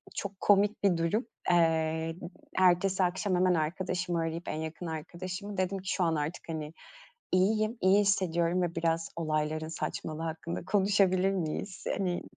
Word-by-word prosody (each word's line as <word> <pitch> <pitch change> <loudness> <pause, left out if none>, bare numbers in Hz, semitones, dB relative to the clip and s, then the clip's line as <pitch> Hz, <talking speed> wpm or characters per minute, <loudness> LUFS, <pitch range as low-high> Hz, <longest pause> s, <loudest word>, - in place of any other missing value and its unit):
çok 200 -1 -5
komik 205 +1 +3
bir 185 -4 +4
durum. 170 +9 0 0.3
Eee, 160 -1 +2 0.4
ertesi 185 +1 +4
akşam 185 +1 0
hemen 180 0 +3
arkadaşımı 175 +2 -1
arayıp, 165 +1 -3
en 155 - -2
yakın 160 +2 -5
arkadaşımı, 180 +5 -6
dedim 185 +1 0
ki, 185 - -6
"Şu 185 - +1
an 165 -1 +2
artık, 150 +3 -4
hani, 155 -1 -4 0.6
iyiyim, 215 +5 +2
iyi 190 +2 +5
hissediyorum 180 -3 +1
ve 170 -1 -2
biraz 165 0 0
olayların 155 -1 -1
saçmalığı 160 -1 -4
hakkında 165 +1 -4
konuşabilir 195 -1 +3
miyiz? 185 +1 -3
Hani, 180 -3 -1
175 Hz, 145 wpm, -30 LUFS, 165-190 Hz, 0.6 s, iyi